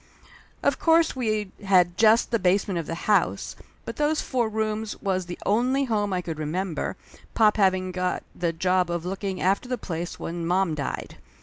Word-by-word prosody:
Of - - +2
course 325 -2 +4
we 215 -5 -1
had 180 -3 +4
just 220 +4 +4
the 230 - +2
basement 185 0 +1
of 165 - -5
the 165 - -5
house, 210 -1 +1 0.3
but - - -6
those 300 +1 +1
four 240 -4 0
rooms 220 0 -2
was 185 -2 -1
the 175 - -6
only 250 +6 +2
home 210 -5 0
I 180 -1 -1
could 160 -3 -5
remember, 165 +3 -3 0.4
pop 215 -1 +4
having 185 -2 +2
got 180 0 -2
the 170 -1 0
job 180 +1 +1
of 170 0 -3
looking 190 0 -3
after 195 +7 +1
the 250 - -1
place 170 -4 -5
when 170 0 -4
mom 180 0 +1
died. 145 -3 -4
190 Hz, 180 wpm, -25 LUFS, 175-220 Hz, 0.4 s, course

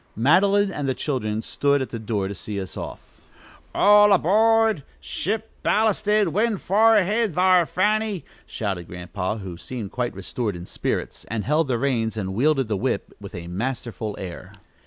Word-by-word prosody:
Madeline 195 - +3
and 145 -6 -3
the 130 - 0
children 110 -6 -2
stood 140 +4 +1
at 130 - -4
the 115 - -4
door 105 -3 -2
to 100 - -5
see 100 +1 -5
us 95 -2 -7
off. - - -9 0.5
"All 205 0 +6
aboard! 220 +1 +4 0.2
ship 220 +5 -3
ballasted! 210 -1 +2
wind 220 0 +1
fa'r! 220 +4 +4
go 210 - +6
ahead 210 -1 0
thar', 180 -2 +4
Fanny!" 210 0 0 0.2
shouted 95 -6 -4
Grandpa, 90 +4 -4
who 95 -5 -7
seemed 110 +1 -7
quite 120 -3 -2
restored 100 +2 -3
in 85 0 -8
spirits, - - -3
and 110 -2 -3
held 155 +1 +1
the 125 -2 0
reins 115 -4 -1
and 95 -2 -3
wielded 135 +3 +2
the 105 - -1
whip 120 -1 -2
with 100 -1 -10
a 85 -1 -6
masterful 110 +2 -4
air. 90 -2 -8
130 Hz, 170 wpm, -23 LUFS, -, 0.5 s, All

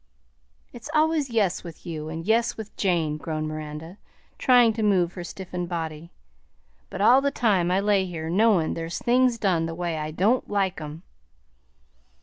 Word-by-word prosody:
"It's 240 +4 -9
always 310 -2 +2
'yes' 210 -6 0
with 170 -1 -11
you, 155 -3 -5
and 160 +1 -6
'yes' 230 +3 +1
with 220 -2 -8
Jane," 165 -6 0
groaned 155 0 -4
Miranda, 155 +4 -7 0.4
trying 245 -3 +5
to 225 - -4
move 185 -5 +2
her 175 - -6
stiffened 180 -1 -6
body; 165 -1 -5 0.8
"but - - -5
all 250 +6 +6
the 280 - +1
time 205 -10 +1
I 185 +2 +2
lay 200 -2 +2
here 160 -3 -5
knowin' 190 -2 +3
there's 165 +1 -4
things 250 0 +2
done 180 -6 +1
the 165 - -5
way 170 -2 -3
I 155 0 -3
don't 200 +11 +1
like 195 -4 -1
'em." 155 +3 -8
180 Hz, 165 wpm, -25 LUFS, 165-220 Hz, 0.8 s, all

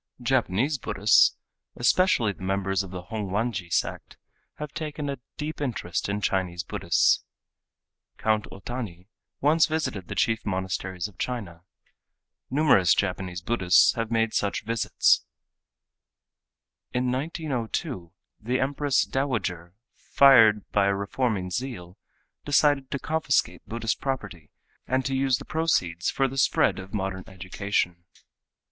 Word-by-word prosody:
Japanese 130 +2 +1
Buddhists, 105 -1 +4 0.4
especially 120 - +3
the - - -18
members 95 0 0
of 95 - -7
the 90 -1 -7
Hongwanji 105 -1 -3
sect, 85 - -2 0.4
have 150 -1 -7
taken 150 -2 -4
a 135 - -6 0.2
deep 150 0 -5
interest 105 -10 -2
in 100 +1 -2
Chinese 90 -3 -1
Buddhists. - - +2 0.9
Count 110 -1 0
Otani 100 -2 -7 0.3
once 155 +3 +4
visited 155 - -2
the - - -5
chief 115 -1 +1
monasteries 95 -1 -3
of 105 - -19
China. 100 -10 -4 0.9
Numerous 130 - +4
Japanese 90 -2 -2
Buddhists 95 -4 +4
have 115 -1 -3
made 115 -1 +1
such 100 - -1
visits. 115 -1 +2 1.7
In 125 0 0
1902, 130 - -3 0.3
the 125 +4 -1
Empress 140 +1 +1
Dowager, 95 -11 -2 0.2
fired 115 -7 +5
by 100 -1 +3
a 100 - +2
reforming 100 -2 -2
zeal, 110 -7 -5 0.5
decided 145 -2 +2
to - - -2
confiscate 160 +3 -1
Buddhist 115 0 -2
property 100 - -4 0.4
and 130 +1 0
to 135 - -1
use 135 -1 +2
the - - -10
proceeds 90 - 0
for 135 - +1
the 135 +1 -4
spread 130 - +3
of 95 0 -10
modern 95 -2 -3
education. 95 -2 -2
110 Hz, 125 wpm, -26 LUFS, 95-135 Hz, 1.7 s, fired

